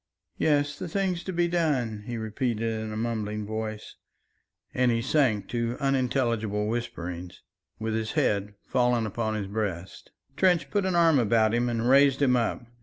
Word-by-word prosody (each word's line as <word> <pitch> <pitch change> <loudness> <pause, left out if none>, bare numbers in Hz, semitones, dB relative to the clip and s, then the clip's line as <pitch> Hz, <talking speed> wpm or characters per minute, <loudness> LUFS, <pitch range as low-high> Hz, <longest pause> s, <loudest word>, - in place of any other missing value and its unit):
"Yes, 145 -1 +1
the - - -4
things 180 0 -1
to 190 - -3
be 175 -1 +1
done," 135 -12 0
he 120 -1 -3
repeated 115 0 -2
in 110 0 -5
a 110 - -4
mumbling 105 -2 -2
voice, 110 0 -5 0.8
and 125 0 +2
he 115 - +1
sank 115 -5 +1
to 120 0 -2
unintelligible 120 -6 0
whisperings, 90 -7 -5 0.3
with 110 0 -3
his 110 0 -2
head 100 0 0
fallen 125 -2 +1
upon 110 +1 -2
his 105 -2 -2
breast. 95 -3 -4 0.3
Trench 180 -1 +2
put 205 -2 +1
an 185 - 0
arm 165 -4 +5
about 110 -1 +3
him 120 +1 +1
and 115 0 -1
raised 135 +1 +5
him 130 -3 +3
up. 120 0 -1
115 Hz, 165 wpm, -27 LUFS, 110-135 Hz, 0.8 s, arm